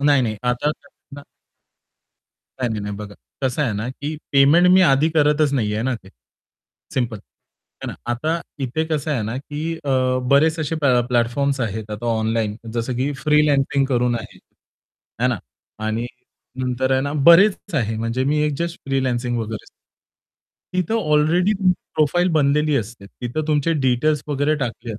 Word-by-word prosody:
नाही-नाही. 130 -7 +3
आता 125 +4 0
कसं 145 - -13
ना 145 - -9 1.4
नाही, 125 - +1
नाही, 110 - -3
नाही 105 0 -4
बघा. 100 0 -8 0.3
कसं 130 +3 0
आहे 125 -7 0
ना, 105 +4 -3
की 145 +4 -5 0.2
पेमेंट 145 +6 +6
मी 190 - +6
आधी 135 +4 +3
करतच 150 -1 +2
नाहीये 110 -5 0
ना 130 +1 0
ते, 100 -4 -11 0.9
सिम्पल. 120 -4 -1
आहे - - -16
ना? - - -5 0.2
आता 155 +8 -1 0.2
इथे 135 +4 -1
कसं 155 -1 -2
आहे 130 -7 0
ना, 110 +3 -3
की 150 +4 -4
अ, 140 - -1 0.4
बरेच 155 +3 +4
असे 155 +1 -2
अ, 160 - -3
प्लॅ 130 -5 +3
प्लॅटफॉर्म्स 125 +3 +1
आहेत. 110 -2 -3
आता 105 +3 -5
ऑनलाईन 110 -1 0 0.2
जसं, 120 +2 -2
की 135 +4 0
फ्रीलान्सिंग 145 -2 +3
करून 125 -2 +1
आहे, 115 +1 -11 0.8
है 125 - +4
ना. 120 -5 -1 0.5
आणि 115 +2 -1 0.5
नंतर 130 +1 0
आहे 130 - +3
ना, 140 +1 -2 0.2
बरेच 190 +4 +7 0.2
आहे, 110 -6 0
म्हणजे 115 +3 -1
मी 150 +2 +1
एक 150 - -1
जस्ट 170 0 -3
फ्रीलान्सिंग 125 -3 -1
वगैरे 110 -1 -6
सां - - -17 1.1
तिथं 185 +4 0 0.2
ऑलरेडी 170 +6 +3
तुमची 185 -2 +3 0.2
प्रोफाइल 175 +4 +2
बनलेली 150 0 +2
असते. 110 -4 -5
तिथं 120 +8 -5
तुमचे 150 +2 +2
डिटेल्स 135 +4 +2
वगैरे 145 +1 +1
टाकले 120 -4 -4
आहेत, 105 - -6
135 Hz, 165 wpm, -21 LUFS, 120-150 Hz, 1.4 s, बरेच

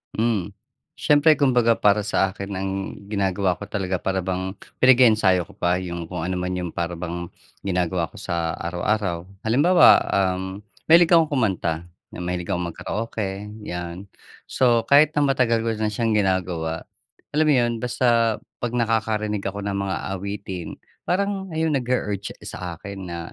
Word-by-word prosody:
Hmm, 110 -5 0 0.5
siyempre 150 +1 +4
kumbaga 125 -4 +4
para 105 0 +3
sa 95 -2 0
akin 100 0 -6
ang 95 0 -2 0.4
ginagawa 100 -2 0
ko - - -9
talaga 95 -3 -2
para 95 +1 -1
bang 95 0 -3 0.3
pinag-eensayo 110 -9 +5
ko - - -17
pa 90 +1 +1
yung 85 -2 -5
kung 85 +2 -6
ano 95 - -1
man 90 0 -2
yung 90 -1 -2
para 85 0 -3
bang 85 0 -5 0.3
ginagawa 90 -3 -1
ko - - -12
sa 85 -1 -2
araw-araw. 90 +1 -1 0.2
Halimbawa, 145 - +5
uhm, 95 0 -1 0.3
mahilig 170 +1 +7
akong 160 -2 +4
kumanta, 90 - 0 0.2
mahilig 90 0 -4
akong 90 -1 -1
mag-karaoke, 105 +1 -4 0.2
yan. 90 0 -5 0.5
So 120 -3 +3
kahit 145 +5 +5
na 145 - +3
matagal 125 -5 +2
ko 115 - 0
na 110 - +1
siyang 110 +2 -1
ginagawa, 90 -5 0 0.5
alam 155 +1 +2
mo 150 - +5
yun 120 -2 +2
basta 120 -2 +2 0.2
'pag 120 0 -3
nakakarinig 110 -3 0
ako 100 +1 -5
ng 100 -1 -2
mga 100 -1 -1 0.2
awitin, 95 -2 -5 0.3
parang 195 +1 0
ayun 160 0 +1
nag-u-urge 120 -7 -2
sa 90 -2 -6
akin 95 +1 -8
na, 85 -1 -5
100 Hz, 150 wpm, -23 LUFS, 90-120 Hz, 0.5 s, mahilig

